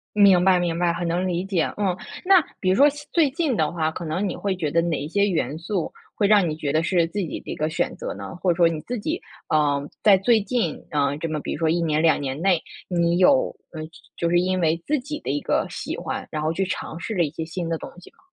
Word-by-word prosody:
明 195 -3 +6
白， 185 -1 +5
明 170 -2 -1
白。 175 -1 +2
很 175 0 -3
能 175 +2 0
理 180 0 -1
解。 190 -4 0
嗯， 190 -3 0 0.3
那 375 -3 +6 0.2
比 185 - -1
如 185 - +4
说 285 +6 +6 0.2
最 315 -5 +3
近 290 -4 0
的 155 -1 +1
话， 160 -2 0
可 170 - -6
能 180 +6 -1
你 - - -3
会 195 -2 -2
觉 155 -5 -2
得 170 +2 +2
哪 170 -3 -1
一 145 - -5
些 200 +3 +2
元 160 -4 -1
素 175 0 -3 0.2
会 205 - +2
让 200 -4 +5
你 155 - -3
觉 145 -3 -2
得 160 +1 +2
是 170 -1 +2
自 195 +5 -6
己 170 - -3
的 - - -9
一 - - -2
个 155 -1 -1
选 - - -1
择 - - -5
呢？ 100 0 -8
或 180 +1 0
者 - - -5
说 170 -2 +5
你 160 -2 -3
自 245 +5 -5
己， 315 - -3 0.3
呃， 145 -2 +2 0.2
在 200 -3 +6
最 220 +1 +3
近， 210 -6 -2
啊， 145 -1 +1
这 165 +2 -4
么 155 -1 -2
比 - - -4
如 - - -4
说 160 -1 +1
1 170 +1 +1
年、 155 -1 +1
2 160 -3 +4
年 135 +2 -4
内， 180 -3 +3 0.3
你 170 -1 +1
有 265 +8 +4 0.2
嗯， 155 -1 -6 0.3
就 170 - 0
是 175 +1 +3
因 185 +1 0
为 165 0 +1
自 300 0 +1
己 300 +4 -6
的 - - -4
一 145 +1 0
个 - - 0
喜 - - -5
欢， - - -4
然 155 - -2
后 155 +1 0
去 195 +3 0
尝 175 -3 -5
试 220 +5 -4
了 180 - +2
一 150 - 0
些 160 +1 -5
新 170 +1 -4
的 165 - -1
东 - - -8
西 - - -15
吗？ - - -31
175 Hz, 290 characters per minute, -23 LUFS, 160-195 Hz, 0.3 s, 明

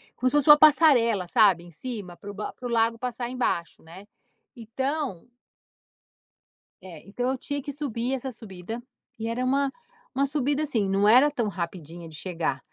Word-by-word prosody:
como 255 - +1
se 290 - -1
fosse 295 +1 +2
uma 295 - +11
passarela, 250 - +5
sabe, 185 -2 +4
em 175 - -14
cima, 205 -2 -7
para 205 - -9
o - - -11
ba 210 +1 -6
para 250 - -12
o - - -5
lago 230 0 +2
passar 240 0 -4
embaixo, 245 -12 -2
né. 180 +5 -13 0.5
Então 255 - -4 1.5
É. 170 -5 -11
Então 245 +5 -2
eu 265 - -2
tinha 285 +2 -4
que 285 - -6
subir 260 -4 -3
essa 265 0 -3
subida. 220 -1 -8 0.4
E 225 - -3
era 230 +2 -2
uma 275 +2 +1 0.4
uma 275 +1 +1
subida, 290 +1 0
assim, 230 -9 0
não 195 +1 +2
era 255 +7 +7
tão 240 -7 -2
rapidinha 170 -3 -6
de 155 - -12
chegar. 165 -5 -3
230 Hz, 180 wpm, -26 LUFS, 190-265 Hz, 1.5 s, uma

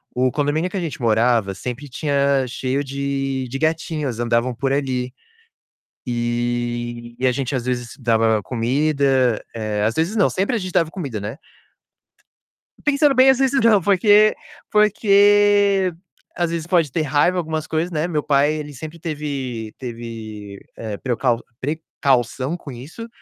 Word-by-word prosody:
O 130 0 +2
condomínio 150 +4 0
que 195 - -5
a - - 0
gente 160 -7 -5
morava, 115 -2 +2
sempre 125 +8 -6
tinha 140 -1 +1
cheio 130 +2 -2
de 135 -1 -2
gatinhos, 155 -6 -1
andavam 120 +1 0
por 135 +3 -1
ali. 130 -3 -1 0.9
E 120 0 -2
e 130 - +1
a 125 - +3
gente 135 +2 -3
às 125 -3 -1
vezes 120 -2 -3
dava 115 -3 +2
comida, 130 0 +1
eh, 110 -2 -2
às 115 - +1
vezes 165 - 0
não, 200 - +4
sempre 195 +6 -1
a - - +1
gente 185 -2 -5
dava 165 -1 +2
comida, 140 - -5
né 105 +7 -6 1.5
pensando 285 -1 +3
bem, 260 +1 +7
às 265 - +3
vezes 270 0 +2
não 215 -4 +5
porque 205 +3 +5 0.4
porque 205 -2 +4 0.4
às 175 -1 0
vezes 165 0 -4
pode 165 -7 +2
ter 160 - 0
raiva, 150 +5 +2
algumas 160 -2 -2
coisas, 160 +3 -1
né. 155 0 -1
Meu 155 -4 -1
pai 145 +1 +2
ele 150 -1 -6
sempre 155 +5 -9
teve 140 -8 -4
teve, 110 -4 -8 0.2
eh, 110 -3 -5
precau 120 -1 0 0.2
precaução 135 -1 -1
com 150 - -10
isso, 150 - -9
140 Hz, 150 wpm, -21 LUFS, 120-165 Hz, 1.5 s, bem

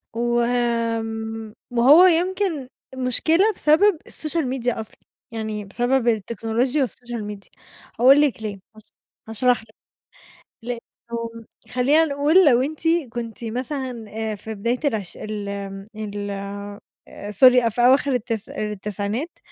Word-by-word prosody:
و 240 +1 +1
آمم 225 -2 -1 0.2
وهو 270 +9 +7
يمكن 360 -4 +1 0.3
مشكلة 320 - +2
بسبب 325 +4 +4
الSocial 320 +1 -3
Media 245 -2 -1
أصلًا، 220 - -9 0.3
يعني 215 -2 -4
بسبب 245 +5 0
التكنولوجيا 235 +5 0
والSocial 240 -2 -7
Media، 200 -1 -14 0.5
هاقول 270 +4 +7
لِك 280 -6 +1
ليه، 210 -2 -4 0.2
هاشـ– 215 - -17 0.4
هاشرح 240 +1 +2
لِك، 220 0 -22 0.9
لإنه 230 -1 -7 0.3
خلّينا 280 +6 +3
نقول 300 +5 +4
لو 250 -3 +5
أنتِ 300 +3 -4 0.3
كنتِ 235 -1 -6
مثلًا 250 0 -4
آآ 220 0 -3
في 220 +2 -7
بداية 235 +5 -1
العش 220 - -2
ال 210 -1 -5
آمم، 195 -1 -6
ال 205 -1 -5 1.0
Sorry 250 +3 +6
أ - - +5
في 230 +2 -4
أواخر 265 +3 +4
التسـ– 230 -3 -2
التسعينات، 210 - -4
235 Hz, 125 wpm, -22 LUFS, 220-265 Hz, 1.0 s, وهو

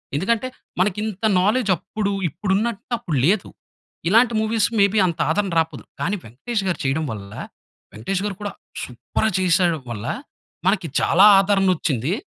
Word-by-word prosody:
ఎందుకంటే, 220 - 0 0.3
మనకు 185 +1 +1
ఇంత 215 -1 -5 0.2
నాలెడ్జ్ 215 +2 +2
అప్పుడు 205 +4 -3 0.2
ఇప్పుడు 190 +6 -2
ఉన్నటు 225 -1 -2
అప్పుడు 175 -11 -3
లేదు. 190 +3 +2 0.6
ఇలాంటి 230 +4 +4
మూవీస్ 220 0 +1
మేబి 200 +1 +4
అంత 170 - -4
ఆదరణ 195 +3 0
రాకపోదు. 160 0 -2 0.2
కానీ 195 - 0
'వెంకటేష్' 195 - -4
గారు 180 -4 -1
చేయడం 145 +4 0
వల్ల, 100 -1 -8 0.6
'వెంకటేష్' 185 - -3
గారు 205 -2 -3
కూడా 205 -1 -3 0.3
సూపర్‌‌గా 125 - -2
చేసేయడం 175 -3 +2
వల్ల 105 -3 -5 0.6
మనకి 190 -3 +2
చాలా 190 +5 +5
ఆదరణొచ్చింది. 185 - +1
190 Hz, 140 wpm, -22 LUFS, 160-210 Hz, 0.6 s, చాలా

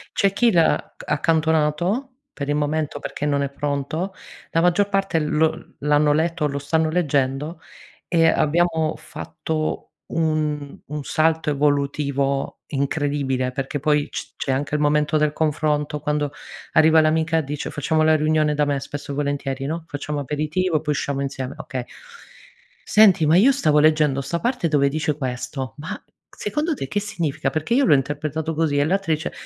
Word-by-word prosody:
C'è 200 - +3
chi 225 +4 +3
l'ha 170 -4 +2
accantonato, 160 - +1 0.3
per 140 -1 -5
il 145 - +1
momento 150 0 -1
perché - - -5
non 145 -1 +1
è 140 - -1
pronto, 145 +6 -3 0.4
la 165 - +2
maggior 180 +3 +3
parte 195 -3 0
lo 155 +1 -1
l'hanno 150 0 +3
letto, 165 +2 0
o - - +3
lo 140 0 -3
stanno 160 +3 +1
leggendo 150 -1 0 0.5
e 165 -2 +3
abbiamo 160 0 +2
fatto 155 0 -4 0.2
un 155 -3 -1
un 150 0 -5
salto 160 +1 +1
evolutivo 140 -1 0
incredibile 140 -2 -1
perché 135 +3 -3
poi 150 0 +1
c - - -7
c'è 135 - -2
anche 140 +3 -1
il 150 - 0
momento 150 +1 +2
del 150 -1 +2
confronto, 150 -1 0
quando 150 -1 -1 0.4
arriva 160 0 +6
l'amica 160 +1 +2
dice 145 0 -5
facciamo 155 +2 +1
la 155 0 +5
riunione 155 0 +2
da 150 0 +1
me, 145 -1 0
spesso 140 0 -6
e - - -5
volentieri, 140 -2 -2
no, 160 +3 -3
facciamo 145 +1 -4
aperitivo, 155 +4 -1
poi 150 - -1
usciamo 140 -1 -2
insieme, 135 -1 -4
okay. 130 -2 -5 1.0
"Senti, 200 -7 +5
ma 160 +4 +5
io 260 +8 +6
stavo 155 - +3
leggendo 150 -2 +3
sta 170 +5 -2
parte 245 -7 0
dove 145 -3 +3
dice 150 0 -1
questo, 130 0 -4
ma 155 +3 -6 0.3
secondo 310 +2 -2
te 135 - -5
che 205 - -1
significa? 155 -8 -2
Perché 155 +10 -2
io 275 +1 +4
l'ho - - +5
interpretato 150 +3 -1
così," 155 -2 0
e 145 - +3
l'altra 185 0 +1
dice: 155 +2 -3
150 Hz, 165 wpm, -22 LUFS, 145-160 Hz, 1.0 s, arriva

